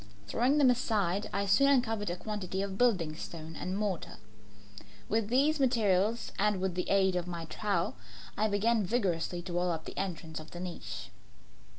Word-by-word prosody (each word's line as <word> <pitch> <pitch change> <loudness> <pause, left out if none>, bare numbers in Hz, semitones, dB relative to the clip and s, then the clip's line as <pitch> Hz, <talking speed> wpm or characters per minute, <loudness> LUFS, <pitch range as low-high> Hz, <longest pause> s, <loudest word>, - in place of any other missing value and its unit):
Throwing 245 - +2
them 275 -4 +6
aside, 205 -6 0
I 200 - 0
soon 200 +8 +5
uncovered 225 -7 +2
a 175 - -1
quantity 195 -1 -3
of 195 -1 -4
building 190 -9 +2
stone 160 0 -7
and 185 +4 -3
mortar. 200 -5 -2 0.9
With 220 0 +1
these 285 +5 +3
materials 225 -4 +2
and 210 -1 +2
with 190 -1 -1
the 180 +1 -2
aid 190 -1 +3
of 180 -1 -1
my 170 -2 -4
trowel, 185 0 -1 0.4
I 215 - +2
began 215 +2 +2
vigorously 180 -5 -1
to 175 - -6
wall 175 +1 +1
up 160 -2 -3
the - - -8
entrance 165 -4 -4
of 155 0 -10
the 175 - -8
niche. 180 -1 -6
195 Hz, 175 wpm, -31 LUFS, 175-225 Hz, 0.9 s, them